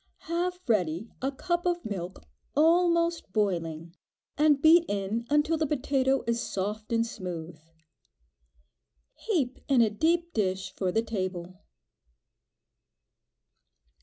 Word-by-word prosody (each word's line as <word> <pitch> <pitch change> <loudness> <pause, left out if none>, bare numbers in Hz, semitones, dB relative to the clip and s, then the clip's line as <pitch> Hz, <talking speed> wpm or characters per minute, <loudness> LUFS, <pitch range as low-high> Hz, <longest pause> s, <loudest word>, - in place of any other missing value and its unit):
Have 355 +2 -2
ready 190 -2 0
a 270 +2 0
cup 345 +5 -2
of 350 -1 -1
milk 190 -3 -5 0.3
almost 335 - +3
boiling, 170 -5 -1 0.4
and 295 -1 +4
beat 325 +3 +7
in 205 +4 -2
until 295 +2 +2
the 315 0 0
potato 270 -1 +1
is 235 0 0
soft 210 +3 -4
and 230 0 +2
smooth. 175 -6 -6 1.5
Heap 295 - -1
in 270 -4 +4
a 220 -2 +3
deep 335 +9 +1
dish 190 -3 -1
for 185 -2 -1
the 225 +4 +1
table. 185 -4 -4
235 Hz, 110 wpm, -28 LUFS, 190-315 Hz, 1.5 s, beat